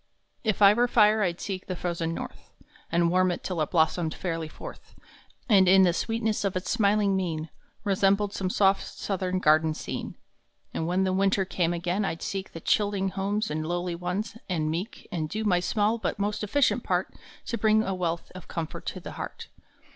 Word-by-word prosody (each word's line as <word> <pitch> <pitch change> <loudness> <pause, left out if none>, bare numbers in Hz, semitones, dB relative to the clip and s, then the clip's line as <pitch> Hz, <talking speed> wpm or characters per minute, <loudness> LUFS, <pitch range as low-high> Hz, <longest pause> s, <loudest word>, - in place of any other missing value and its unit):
IF 215 -2 +1
I 200 +1 +9
were 240 +3 +3
fire 215 -2 +4
I 180 -4 +2
d - - -19
seek 190 -1 -5
the 185 - -3
frozen 170 -2 -2
North - - -8 0.4
And 170 0 +3
warm 185 0 +3
it 175 - -3
till 180 -4 -2
it 155 - 0
blossomed 160 -1 +1
fairly 165 -3 -3
forth - - -11 0.5
And 195 -5 +5
in 190 +1 +7
the 175 -2 +4
sweetness 225 +2 -1
of 195 -2 -1
its 185 - -2
smiling 205 -3 +3
mien 165 -4 -2 0.3
Resembled 200 0 +2
some 190 -3 -2
soft 195 +1 +3
southern 185 -2 -3
garden 155 -2 +3
scene. - - -5 0.6
And 160 - -2
when 180 +2 +1
the 185 -1 +1
winter 195 0 +2
came 175 -2 0
again 175 +4 -1
I 195 - -1
d - - -11
seek 195 -1 -4
The 165 - -8
chilling 200 0 +1
homes 200 +2 -1
of 155 - -1
lowly 175 +2 -2
ones 180 +6 -3
and 155 -4 0
meek 180 +8 -5
And 155 -3 -2
do 215 +5 -3
my 185 -4 +3
small 210 +5 +1
but - - -2
most 205 +1 -1
efficient 255 +7 +2
part - - -1 0.3
To 235 - -2
bring 220 0 +4
a 195 - -2
wealth 170 -2 -2
of 185 -2 -10
comfort 165 -2 -5
to - - -3
the - - -8
heart. - - -7
190 Hz, 200 wpm, -27 LUFS, 170-205 Hz, 0.6 s, I